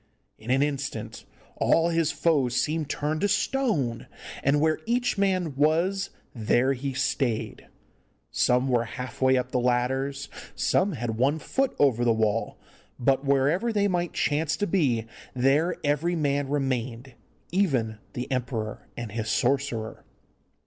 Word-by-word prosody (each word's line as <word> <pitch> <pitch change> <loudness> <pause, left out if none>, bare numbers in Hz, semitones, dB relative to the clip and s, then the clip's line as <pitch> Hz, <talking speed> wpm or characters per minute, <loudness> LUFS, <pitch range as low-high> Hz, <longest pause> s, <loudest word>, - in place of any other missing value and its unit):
In 110 - -10
an 135 +2 +3
instant 145 -1 -4 0.3
all 165 +1 +3
his 165 -2 +1
foes 145 -5 +1
seemed 155 +3 0
turned 150 +2 -2
to 205 - +3
stone, 205 - 0 0.4
and 140 +2 +3
where 155 +1 +2
each 245 +1 +1
man 185 -7 0
was 170 +7 +1 0.2
there 120 +3 +2
he 135 +1 -4
stayed. 115 -5 -1 0.6
Some 125 +2 +2
were 120 -2 +2
half 125 +4 -7
way 130 0 +4
up 125 0 -2
the 125 - +1
ladders, 130 +3 0 0.3
some 195 0 +1
had 120 -4 -3
one 140 +6 +2
foot 270 - -1
over 125 -4 +3
the 120 - +4
wall, 110 0 0 0.4
but 135 +2 +2
wherever 140 - +2
they 205 -2 +2
might 175 -2 -1
chance 155 +1 0
to 205 - 0
be 140 - +1 0.3
there 140 +7 +2
every 150 +4 +1
man 145 -3 0
remained, 130 -3 -2 0.4
even 130 - +1
the 125 - -3
emperor 120 -4 -3
and 120 -3 -5
his 110 0 -3
sorcerer. 120 -2 -1
140 Hz, 140 wpm, -26 LUFS, 125-160 Hz, 0.6 s, way